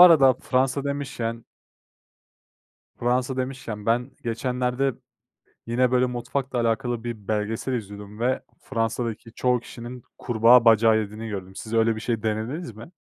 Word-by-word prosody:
arada 155 Hz, -7 st, +9 dB
Fransa 130 Hz, +2 st, 0 dB
demişken 130 Hz, -5 st, -3 dB, 1.5 s
Fransa 125 Hz, +2 st, 0 dB
demişken 130 Hz, -5 st, -4 dB
ben 120 Hz, +3 st, +1 dB
geçenlerde, 125 Hz, +2 st, 0 dB, 0.7 s
yine, 125 Hz, +1 st, +2 dB
böyle, 125 Hz, 0 st, +4 dB
mutfakla 125 Hz, +1 st, -2 dB
alakalı 120 Hz, 0 st, 0 dB
bir 110 Hz, -5 st, -6 dB
belgesel 110 Hz, +4 st, -1 dB
izliyordum 105 Hz, -2 st, -6 dB
ve 125 Hz, +2 st, 0 dB, 0.2 s
Fransa'daki 115 Hz, 0 st, -2 dB
çoğu 125 Hz, -1 st, +2 dB
kişinin 120 Hz, +1 st, -9 dB
kurbağa 120 Hz, +1 st, +5 dB
bacağı 115 Hz, -1 st, +6 dB
yediğini 110 Hz, +1 st, -5 dB
gördüm. 95 Hz, -2 st, -6 dB
Siz 110 Hz, +2 st, -7 dB
öyle 115 Hz, 0 st, +3 dB
bir 110 Hz, -, -6 dB
şey 115 Hz, -2 st, -2 dB
denediniz 110 Hz, +5 st, -2 dB
mi? 115 Hz, +9 st, -11 dB
120 Hz, 130 wpm, -25 LUFS, 110-125 Hz, 1.5 s, arada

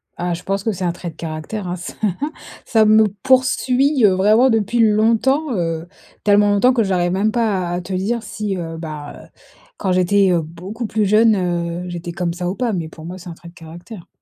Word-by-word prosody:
Ah 175 Hz, 0 st, -2 dB
je 170 Hz, -, -6 dB
pense 195 Hz, 0 st, -2 dB
que 225 Hz, -, 0 dB
c'est 190 Hz, -1 st, -5 dB
un 175 Hz, -, +1 dB
trait 175 Hz, 0 st, -7 dB
de -, -, -23 dB
caractère, 165 Hz, +5 st, -5 dB
hein. 175 Hz, -, -3 dB
Ça 175 Hz, -, -8 dB, 0.7 s
ça 220 Hz, -2 st, +3 dB
me 215 Hz, 0 st, +6 dB, 0.2 s
poursuit, 260 Hz, +1 st, +2 dB
heu, 195 Hz, -, +5 dB
vraiment 215 Hz, +7 st, +4 dB
depuis 225 Hz, +1 st, 0 dB
longtemps, 230 Hz, +6 st, +2 dB
heu, 165 Hz, -1 st, -2 dB, 0.4 s
tellement 205 Hz, 0 st, +4 dB
longtemps, 250 Hz, +6 st, +4 dB
que 230 Hz, -3 st, +2 dB
j'arrive 180 Hz, -2 st, 0 dB
même 205 Hz, +3 st, +1 dB
pas 205 Hz, -7 st, 0 dB
à -, -, -3 dB
à 180 Hz, -, -3 dB
te 185 Hz, +2 st, -7 dB
dire 220 Hz, +5 st, -1 dB
si, 205 Hz, -2 st, -4 dB
heu, 165 Hz, -1 st, -5 dB
bah, 155 Hz, -3 st, -7 dB
heu, -, -, -19 dB, 0.5 s
quand 190 Hz, -, -1 dB
j'étais, 185 Hz, +2 st, +3 dB
heu, 170 Hz, -2 st, +2 dB
beaucoup 185 Hz, +9 st, -7 dB
plus 215 Hz, -1 st, 0 dB
jeune, 215 Hz, +2 st, +4 dB, 0.5 s
heu, -, -, -7 dB
j'étais 175 Hz, 0 st, -6 dB
comme 170 Hz, -1 st, -2 dB
ça 180 Hz, 0 st, -3 dB
ou 190 Hz, -, -3 dB
pas, 240 Hz, -4 st, -1 dB
mais 165 Hz, -3 st, -3 dB
pour 160 Hz, 0 st, -12 dB
moi, 180 Hz, +2 st, -7 dB
c'est 180 Hz, -1 st, -10 dB
un -, -, -7 dB
trait 170 Hz, +1 st, -13 dB
de -, -, -18 dB
caractère. 175 Hz, +4 st, -11 dB
195 Hz, 225 wpm, -19 LUFS, 175-220 Hz, 0.7 s, me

